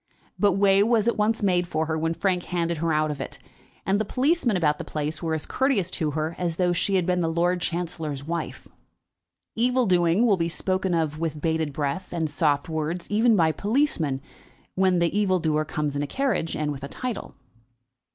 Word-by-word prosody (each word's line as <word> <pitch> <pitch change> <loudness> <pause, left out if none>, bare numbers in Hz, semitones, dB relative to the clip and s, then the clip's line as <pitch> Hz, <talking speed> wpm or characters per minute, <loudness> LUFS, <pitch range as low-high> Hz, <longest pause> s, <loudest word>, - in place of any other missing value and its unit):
But 205 -2 +4
way 195 0 +4
was 225 0 +3
at 235 - +2
once 215 +1 +1
made 180 -3 +2
for 160 -2 -1
her 160 0 -2
when 165 +1 -1
Frank 180 -2 0
handed 170 -2 -1
her 165 +1 0
out 155 0 +1
of 140 -2 -5
it, - - -6 0.5
and 200 +2 +2
the - - +2
policemen 255 - +1
about 150 -4 +1
the - - -4
place 155 0 -4
were 165 -2 -1
as 155 - -4
courteous 245 -10 0
to 155 -3 -1
her 155 +2 -1
as 175 -2 -1
though 180 0 +1
she 195 +3 +1
had 185 -2 +2
been 180 0 +1
the 165 -1 0
Lord 175 +2 +1
Chancellor's 160 -5 -3
wife. 170 +3 -5 0.9
Evil 250 +2 +2
doing 180 +3 +3
will 205 -5 +4
be 165 -1 0
spoken 185 +1 -1
of 155 -2 -1
with 160 -2 -2
bated 160 -1 0
breath 145 +6 -3
and 160 -3 -2
soft 145 -1 +1
words 160 +2 -3
even 225 +2 +4
by 165 -4 +3
policemen, 200 - 0 0.5
when 185 -1 +2
the 170 +2 +1
evil 200 -3 +2
doer 155 -2 +1
comes 150 -1 -3
in 145 - -1
a 145 - -2
carriage, 260 - -1
and 150 -1 -1
with 140 -1 -7
a - - -3
title. 250 - -5
170 Hz, 205 wpm, -25 LUFS, 155-195 Hz, 0.9 s, But